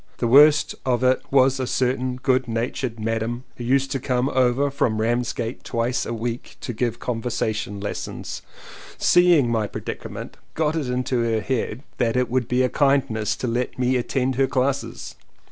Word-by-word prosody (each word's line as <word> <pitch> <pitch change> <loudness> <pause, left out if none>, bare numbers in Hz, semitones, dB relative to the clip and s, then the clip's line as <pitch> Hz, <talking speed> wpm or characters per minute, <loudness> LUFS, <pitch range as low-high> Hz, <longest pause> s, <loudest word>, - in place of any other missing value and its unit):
The - - -1
worst 145 +4 +6
of 125 -1 0
it 130 0 +3
was 135 -1 +4
a 130 - -1
certain 130 0 0
good 130 0 +1
natured 115 +1 -3
"Madam" 115 +2 -2
who 120 - -6
used 135 +2 +1
to 135 - -1
come 125 +1 0
over 130 +2 +2
from 110 -5 0
Ramsgate 120 +1 -1
twice 115 +1 -1
a - - -3
week 115 +1 -5
to 120 - -4
give 120 0 -1
conversa 115 -2 -2
tion 105 -1 -5
lessons, 100 +1 -5 0.6
seeing 175 -8 +4
my 110 -2 0
predicament - - -7 0.2
got 155 0 +1
it 150 -6 -2
into 125 0 0
her 115 -2 0
head 125 +1 -2 0.2
that 115 -2 +1
it 125 -1 0
would 125 -2 +1
be 125 +1 +2
a - - +3
kindness 125 -7 +1
to 125 - -4
let 120 +2 -2
me 130 0 +1
attend 130 +1 0
her 135 -1 +3
classes. 135 +1 -2
125 Hz, 175 wpm, -23 LUFS, 115-130 Hz, 0.6 s, worst